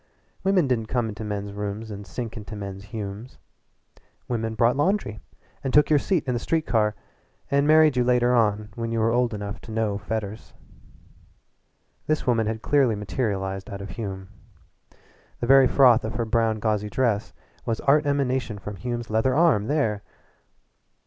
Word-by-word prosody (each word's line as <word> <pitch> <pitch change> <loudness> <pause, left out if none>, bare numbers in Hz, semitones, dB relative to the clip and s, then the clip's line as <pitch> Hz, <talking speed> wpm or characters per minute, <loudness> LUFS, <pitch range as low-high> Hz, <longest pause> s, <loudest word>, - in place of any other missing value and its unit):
Women 190 -4 +3
didn't 120 -4 -1
come 120 -1 -1
into 105 +1 -7
men's 100 -1 -4
rooms 105 +2 -5
and 100 -1 -8
sink 115 +3 -5
into 110 -1 -8
men's 100 -1 -7
Humes. 105 +2 -7 0.9
Women 115 -2 -2
brought 115 +2 +3
laundry 145 - 0 0.4
and 135 - -1
took 150 +3 +4
your 150 - +5
seat 180 +1 0
in 125 - +1
the 120 - -1
street 160 +5 -1
car 105 -2 +1 0.6
and 140 +1 +3
married 155 -2 +6
you 125 - +3
later 125 0 +3
on 105 -3 +1
when 115 +1 -4
you 115 - -1
were 115 +1 +2
old 120 0 +2
enough 105 -1 -6
to 115 - -10
know 110 -2 -1
fetters. 110 +1 -5 1.5
This 155 0 0
woman 115 -4 +2
had 110 0 -3
clearly 135 -6 +3
materialized 95 -2 -3
out 100 - -6
of 100 -1 -7
Hume. 95 -3 -6 1.1
The - - -2
very 135 +1 +7
froth 125 -4 +5
of 110 +1 -4
her 115 0 -1
brown 115 -1 +1
gauzy 105 -1 -1
dress 110 -2 0 0.4
was 115 -2 -1
art 145 +2 +3
emanation 130 -5 0
from 105 0 -7
Hume's 120 +3 -4
leather 110 +4 +2
arm 150 -11 +3
there! 115 -9 0
115 Hz, 170 wpm, -25 LUFS, 105-130 Hz, 1.5 s, very